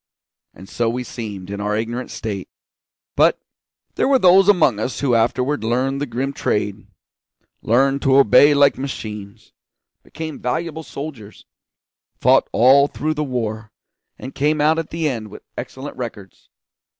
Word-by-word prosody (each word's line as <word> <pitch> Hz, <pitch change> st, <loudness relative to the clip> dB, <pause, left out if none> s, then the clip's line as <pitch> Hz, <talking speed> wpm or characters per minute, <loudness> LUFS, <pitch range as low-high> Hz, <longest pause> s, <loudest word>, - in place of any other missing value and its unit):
And 95 Hz, -, -13 dB
so 115 Hz, +2 st, -1 dB
we 125 Hz, +2 st, -3 dB
seemed, 100 Hz, -6 st, -7 dB
in 100 Hz, 0 st, -5 dB
our 105 Hz, +1 st, -1 dB
ignorant 120 Hz, +3 st, -4 dB
state; 100 Hz, -4 st, -5 dB, 0.7 s
but -, -, +4 dB, 0.6 s
there -, -, 0 dB
were 275 Hz, -1 st, +4 dB
those 190 Hz, -2 st, +5 dB
among 155 Hz, -, +4 dB
us 125 Hz, +4 st, -3 dB
who 135 Hz, -4 st, +1 dB
afterward 125 Hz, +4 st, +1 dB
learned 130 Hz, +4 st, -1 dB
the 145 Hz, -, -2 dB
grim 130 Hz, +4 st, -3 dB
trade; 105 Hz, -4 st, -2 dB, 0.7 s
learned 135 Hz, +4 st, +2 dB
to 135 Hz, -2 st, +3 dB
obey 140 Hz, +3 st, +6 dB
like 140 Hz, -2 st, +4 dB
machines; 105 Hz, -7 st, -7 dB, 0.5 s
became 155 Hz, -1 st, -8 dB
valuable 160 Hz, +5 st, -3 dB
soldiers; 140 Hz, -9 st, -9 dB, 0.7 s
fought -, -, +3 dB
all 135 Hz, +4 st, +5 dB
through 155 Hz, +2 st, -3 dB
the 150 Hz, 0 st, -2 dB
war, 110 Hz, -5 st, -4 dB, 0.5 s
and 130 Hz, -, -9 dB
came 150 Hz, +2 st, 0 dB
out 155 Hz, +2 st, +3 dB
at 165 Hz, -, -5 dB
the 165 Hz, -1 st, -2 dB
end 115 Hz, -6 st, -3 dB
with -, -, -12 dB
excellent 135 Hz, +2 st, -7 dB
records. 105 Hz, -7 st, -9 dB
130 Hz, 150 wpm, -20 LUFS, 110-145 Hz, 0.7 s, obey